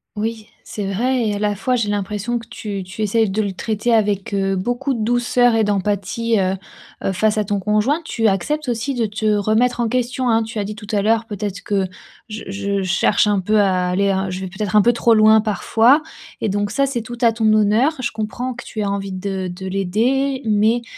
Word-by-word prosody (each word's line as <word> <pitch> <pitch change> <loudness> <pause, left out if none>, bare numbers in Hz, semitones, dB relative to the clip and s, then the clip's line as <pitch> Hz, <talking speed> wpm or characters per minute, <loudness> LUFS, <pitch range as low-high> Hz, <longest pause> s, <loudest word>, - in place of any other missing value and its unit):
Oui, 220 0 -3 0.2
c'est 205 - -5
vrai 250 +4 +1
et - - -1
à - - -4
la 205 0 0
fois, 250 +5 0
j'ai 225 -4 0
l'impression 205 +3 -2
que 230 - -8
tu 215 -5 -5
tu 185 +4 -8
essaies 220 +2 +2
de 200 +3 -1
le 200 -2 -2
traiter 220 +4 -2
avec, 205 -3 0
heu, 195 0 0
beaucoup 245 +8 -1
de 230 - -3
douceur 245 +1 +2
et 225 - +3
d'empathie, 205 +3 0
heu 190 0 +1 0.5
heu, - - 0
face 215 +3 +1
à 210 - 0
ton 205 +1 -1
conjoint. 215 - +1
Tu 225 -7 0
acceptes 260 +9 -1
aussi 240 +4 -1
de 235 -3 0
te 210 +1 -5
remettre 215 +4 +2
en 235 - +1
question, 250 +1 -1
hein, 225 0 +3
tu 225 0 -5
as 205 - -1
dit 210 +1 -6
tout 210 0 -10
à 205 -2 +1
l'heure: 225 +2 +2
«Peut-être 205 -3 -4
que 195 -2 0 0.4
je 215 0 -6
je 200 0 -2
cherche 190 +3 +2
un 205 -1 +2
peu 210 +3 +2
à 185 -3 +2
aller 200 +2 +1
à 190 0 -1
je 185 +1 -5
vais 190 - -4
peut-être 190 +2 -3
un 210 - +6
peu 240 - +4
trop 230 -1 +3
loin 215 0 +6
parfois» 225 +6 +3 0.4
et - - 0
donc 205 +1 -1
ça 275 +4 +1
c'est 265 -3 -2
tout 240 +2 -8
à 230 - +6
ton 220 -1 +2
honneur. 215 +7 +3
Je 255 - -2
comprends 220 +4 -4
que 240 - -9
tu 215 - -5
aies - - -1
envie 200 -1 -3
de 190 0 -3
de 180 +1 -7
l'aider, 235 +9 0
mais, 220 +3 +2
215 Hz, 230 wpm, -20 LUFS, 200-235 Hz, 0.5 s, un